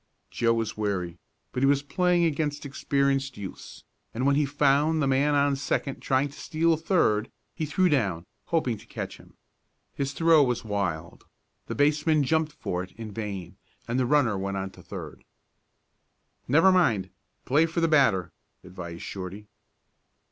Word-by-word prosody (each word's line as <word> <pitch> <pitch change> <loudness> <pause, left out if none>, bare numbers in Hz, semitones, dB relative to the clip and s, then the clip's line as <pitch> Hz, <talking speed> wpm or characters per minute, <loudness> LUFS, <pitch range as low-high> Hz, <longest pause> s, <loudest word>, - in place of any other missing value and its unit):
Joe 115 -1 +2
was 115 -1 -2
wary, 90 -5 -2 0.3
but 125 - -3
he 135 - +4
was 140 0 +3
playing 175 +4 +2
against 145 -2 -1
experienced 140 -1 0
youths, 100 -2 -9 0.3
and 125 +3 -1
when 140 0 +4
he 145 0 +2
found 145 +2 +2
the 145 - +2
man 140 +2 +2
on 140 0 +3
second 135 0 -2
trying 135 +1 +1
to 140 - -14
steal 165 +1 +1
third 155 - +1 0.2
he 155 -3 -3
threw 185 +5 +2
down, 100 - 0 0.2
hoping 130 -10 0
to - - -17
catch - - -6
him. - - -19 0.6
His 140 0 -3
throw 165 0 +5
was 125 -3 -1
wild, 90 -6 -3 0.4
the - - -4
baseman 150 +1 +3
jumped 160 +2 +1
for 90 0 -3
it 90 - -9
in 110 -2 -8
vain, 100 -4 -6 0.3
and 120 +2 0
the 125 - +1
runner 130 -6 +3
went 100 0 -3
on 95 0 -4
to - - -15
third. - - -9 1.2
"Never 165 +9 +5
mind 115 - +2 0.3
play 150 +5 +3
for 165 +1 -2
the 165 - +3
batter," 130 - +3 0.3
advised 90 -2 -8
Shorty. 95 +2 -7
135 Hz, 160 wpm, -27 LUFS, 105-150 Hz, 1.2 s, throw